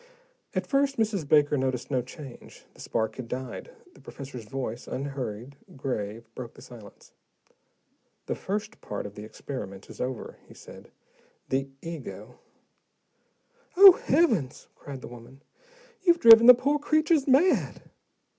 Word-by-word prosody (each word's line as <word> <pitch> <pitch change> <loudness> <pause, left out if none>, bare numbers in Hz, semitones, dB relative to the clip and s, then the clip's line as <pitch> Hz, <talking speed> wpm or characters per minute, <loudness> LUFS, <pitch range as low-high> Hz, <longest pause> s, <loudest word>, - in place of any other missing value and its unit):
At - - -1
first, 275 0 0
Mrs. 210 -8 -1
Baker 150 -1 +4
noticed 130 +1 -3
no 130 -2 +1
change. 130 +1 -12
The - - -15
spark 110 0 -2
had 130 -3 -7
died, 130 - -6 0.2
the - - -19
professor's 130 -4 -9
voice, 120 0 -6
unhurried, 130 -2 -6 0.2
grave, 115 -4 -4
broke 120 -2 -9
the - - -14
silence. 120 -6 -15 1.1
"The - - -2
first 215 +3 -5
part 105 - -6
of 100 - -8
the 105 - -10
experiment 105 -4 -8
is - - -9
over," 125 -2 -5
he - - -16
said. - - -14 0.6
"The 135 +1 -1
ego 165 -4 -9 0.6
" 480 -6 -38
"Oh, 390 0 +12
heavens!" 260 - 0
cried 140 -2 -10
the - - -9
woman. 120 +3 -14 0.6
"You've 345 -2 +3
driven 230 -3 +9
the 250 - +11
poor 285 +4 0
creatures 310 0 +1
mad!" 280 +8 +2
135 Hz, 140 wpm, -27 LUFS, -, 1.1 s, Oh